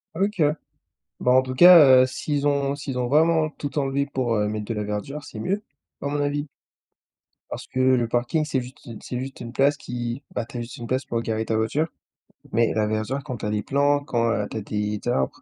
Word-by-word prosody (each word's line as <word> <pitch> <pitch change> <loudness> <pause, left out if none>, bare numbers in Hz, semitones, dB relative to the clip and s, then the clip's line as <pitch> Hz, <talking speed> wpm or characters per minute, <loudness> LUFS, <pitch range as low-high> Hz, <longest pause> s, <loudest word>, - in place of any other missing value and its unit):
OK. 195 0 0 0.8
Bah 125 - +3
en 130 - +6
tout 130 0 -5
cas, 145 -5 +9
heu, - - +3
s'ils 145 +2 -2
ont 140 -1 +1
s'ils 135 -2 -5
ont 125 - -1
vraiment 155 +2 +3
tout 145 -2 -7
enlevé 140 0 0
pour, 130 -4 -1
heu, 105 0 +1
mettre 105 0 -4
de 115 - -3
la 105 -1 -3
verdure, 105 +9 -5
c'est 110 - -8
mieux 195 - -1 0.4
à - - -5
mon 145 +1 -1
avis 145 +1 -2 1.0
parce - - -7
que 130 - -4
le 130 -2 +3
parking, 120 +7 0
c'est 140 -4 -1
juste 125 +3 -12
u 115 -4 -8
c'est 125 - -5
juste 135 +1 -7
une 115 - -6
place 140 +3 +3
qui 120 +1 -5
bah - - -2
tu 125 +1 -9
as - - -3
juste 115 0 -8
une 120 - -7
place 130 +1 -1
pour 115 -1 -2
garer 110 -1 -2
ta 110 - -1
voiture, 115 +9 0 0.6
mais 115 +1 +2
la 110 -1 +1
verdure 110 +6 -2
quand 130 -5 -5
tu - - -6
as - - -1
des 105 -1 -1
plantes, 145 +2 +1
quand 115 -4 +1
heu, 105 -2 -1
tu - - -4
as - - -3
des 105 0 -3
arbres, 65 - -1
130 Hz, 235 wpm, -24 LUFS, 115-145 Hz, 1.0 s, cas